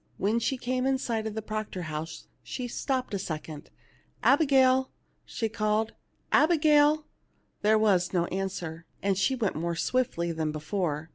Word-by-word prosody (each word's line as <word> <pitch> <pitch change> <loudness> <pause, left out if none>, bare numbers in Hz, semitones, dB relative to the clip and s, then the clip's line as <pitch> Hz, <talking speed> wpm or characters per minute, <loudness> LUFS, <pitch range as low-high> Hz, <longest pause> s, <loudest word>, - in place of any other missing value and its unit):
When 215 +4 +1
she 260 +3 -1
came 255 +1 -1
in 270 0 +2
sight 225 -4 -2
of 215 - -5
the 220 - -3
Proctor 215 -4 -4
house 155 0 -5 0.2
she 250 -2 -5
stopped 255 0 -2
a 200 - -1
second. 155 -3 -6 0.3
" - - -36
Abigail 265 -3 +4 0.2
\" - - -42
she 225 - -2
called 215 0 0 0.2
" - - -42
Abigail 300 -2 +4 0.3
!" - - -43
There 215 +1 +4
was 195 -5 +3
no 175 -2 +1
answer, 175 -4 -4 0.2
and 195 -1 +2
she 195 +8 +1
went 220 -10 -1
on - - -3
more 170 0 -1
swiftly 170 -5 0
than 160 -2 -2
before. 155 0 -2
215 Hz, 180 wpm, -28 LUFS, 170-255 Hz, 0.3 s, Abigail